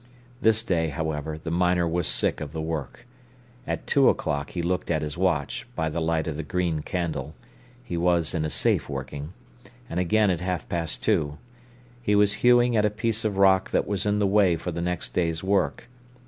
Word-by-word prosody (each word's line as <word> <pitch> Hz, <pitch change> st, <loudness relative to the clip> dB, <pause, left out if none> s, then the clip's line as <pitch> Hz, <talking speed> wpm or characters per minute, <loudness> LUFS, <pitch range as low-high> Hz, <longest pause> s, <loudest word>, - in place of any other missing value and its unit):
This 110 Hz, -2 st, +4 dB
day, 85 Hz, -7 st, +1 dB
however, 80 Hz, -1 st, -3 dB
the 85 Hz, +1 st, -6 dB
miner 90 Hz, 0 st, +2 dB
was 85 Hz, 0 st, -1 dB
sick -, -, +1 dB
of 75 Hz, -1 st, -6 dB
the 80 Hz, -, -4 dB
work. 80 Hz, -, -5 dB, 0.6 s
At -, -, -3 dB
two 140 Hz, -2 st, +4 dB
o'clock 70 Hz, -1 st, -1 dB
he 85 Hz, -, -4 dB
looked 90 Hz, +2 st, -1 dB
at 80 Hz, -2 st, 0 dB
his 75 Hz, -1 st, -4 dB
watch, 85 Hz, -6 st, -1 dB
by 80 Hz, -1 st, -1 dB
the 85 Hz, -, -2 dB
light 80 Hz, -1 st, 0 dB
of 80 Hz, -2 st, -4 dB
the -, -, -2 dB
green 85 Hz, -1 st, -1 dB
candle—he 85 Hz, -, -6 dB
was 85 Hz, -1 st, +1 dB
in 80 Hz, -3 st, -1 dB
a 75 Hz, -, -1 dB
safe -, -, +1 dB
working—and 85 Hz, -, -8 dB
again 105 Hz, +3 st, +3 dB
at 85 Hz, -2 st, -2 dB
half 90 Hz, -2 st, -3 dB
past 85 Hz, -2 st, -2 dB
two. 75 Hz, 0 st, +1 dB, 0.6 s
He 105 Hz, -3 st, +1 dB
was 100 Hz, 0 st, +4 dB
hewing 120 Hz, -1 st, +5 dB
at 105 Hz, -, +3 dB
a 105 Hz, -, +3 dB
piece 110 Hz, +2 st, -2 dB
of 105 Hz, -3 st, -1 dB
rock 95 Hz, -1 st, +4 dB
that -, -, +1 dB
was 100 Hz, 0 st, -1 dB
in 105 Hz, 0 st, +2 dB
the 105 Hz, -, +2 dB
way 95 Hz, -3 st, +4 dB
for 90 Hz, -, -4 dB
the 85 Hz, 0 st, -4 dB
next 90 Hz, -1 st, -2 dB
day's 85 Hz, -2 st, 0 dB
work. 95 Hz, +2 st, 0 dB
85 Hz, 195 wpm, -25 LUFS, 80-100 Hz, 0.6 s, hewing